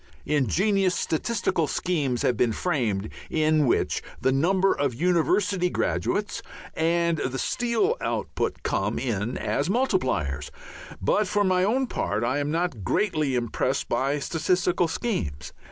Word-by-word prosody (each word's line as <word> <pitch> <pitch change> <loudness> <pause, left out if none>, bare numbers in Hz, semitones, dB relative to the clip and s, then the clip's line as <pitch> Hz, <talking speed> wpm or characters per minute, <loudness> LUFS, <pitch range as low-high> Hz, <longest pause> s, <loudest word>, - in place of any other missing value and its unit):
Ingenious 180 - +2
statistical 170 -2 0
schemes 140 -8 -1
have 125 - +2
been 115 0 +2
framed 110 - -1 0.2
in 155 -2 +2
which - - +1 0.2
the 130 - +2
number 185 +8 +3
of 140 -4 -1
university 180 - +2
graduates 205 +3 -1 0.3
and 170 0 +1
the 130 +1 -2
steel 245 - 0
output - - -2
come - - -1
in 115 -1 -2
as 145 +5 -1
multipliers, 130 - 0 0.5
but 195 - +1
for 205 +2 +1
my 185 -1 +2
own 250 +7 +2
part 110 - -2
I 130 +4 +1
am 145 0 -1
not 165 - -1
greatly 155 - +1
impressed 120 -2 -1
by 140 +2 +1
statistical 175 +4 +1
schemes. 75 - -3
160 Hz, 130 wpm, -25 LUFS, 130-185 Hz, 0.5 s, number